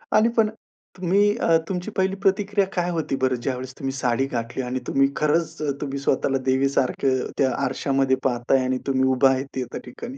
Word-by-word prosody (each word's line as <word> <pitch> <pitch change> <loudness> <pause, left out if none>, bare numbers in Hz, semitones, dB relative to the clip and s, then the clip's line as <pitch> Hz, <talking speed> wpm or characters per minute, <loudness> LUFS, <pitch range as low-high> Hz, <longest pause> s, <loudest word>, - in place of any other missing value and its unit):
आणि 215 +2 +5
पण 220 -1 +4 0.5
तुम्ही 200 +4 +2
अ, 165 -8 +3
तुमची 180 +2 -3
पहिली 190 0 +1
प्रतिक्रिया 200 +1 +2
काय 175 -1 0
होती 160 -5 -1
बरं, 130 -1 +2
ज्यावेळेस 130 0 -3
तुम्ही 135 -1 -2
साडी 125 0 +1
घातली 120 0 -3
आणि 125 +1 -3
तुम्ही 135 0 +3
खरंच 155 +2 0 0.2
तुम्ही 140 -1 -3
स्वतःला 135 0 +1
देवीसारखं 130 -1 +1
त्या 130 -2 +2
आरशामध्ये 135 -1 +1
पाहताय 130 +1 +1
आणि 130 0 0
तुम्ही 130 -1 +2
उभा 135 +1 +5
आहे 130 0 0
त्या 125 -2 -4
ठिकाणी? 240 - -8
135 Hz, 170 wpm, -23 LUFS, 130-180 Hz, 0.5 s, आणि